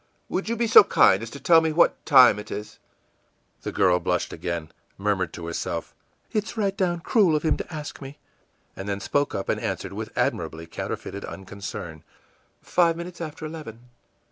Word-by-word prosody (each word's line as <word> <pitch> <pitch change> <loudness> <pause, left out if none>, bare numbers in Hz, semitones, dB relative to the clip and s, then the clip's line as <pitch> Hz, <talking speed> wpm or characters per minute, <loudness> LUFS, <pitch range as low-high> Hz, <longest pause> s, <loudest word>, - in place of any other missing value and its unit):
î - - -19
ìWould 190 - -1
you 230 - 0
be 235 +1 0
so 225 - +9
kind 95 - +4
as 115 - -6
to 140 - -9
tell 165 +1 +6
me 160 -1 0
what 170 +3 +3
time 130 -7 +7
it 105 - -9
is?î 105 +1 -7 0.8
The - - -4
girl 90 -2 +3
blushed - - -1
again, 85 -3 -4 0.3
murmured 95 -4 0
to 85 - -7
herself, 85 0 -4 0.4
ìIt's 215 +2 -2
right 200 -2 0
down 175 -3 0
cruel 190 -6 +3
of 150 - -1
him 160 - +2
to - - -7
ask 150 -2 -7
me!î 135 +1 -8 0.6
and 95 +1 -6
then 100 0 -2
spoke 145 +7 0
up 95 - -3
and - - -1
answered - - -3
with - - -5
admirably 80 +1 -1
counterfeited 100 +4 -6
unconcern, 95 -5 -7 0.6
ìFive 170 -2 +3
minutes 170 +1 -8
after 155 -1 -6
eleven. 125 -7 -9
135 Hz, 185 wpm, -25 LUFS, -, 0.8 s, so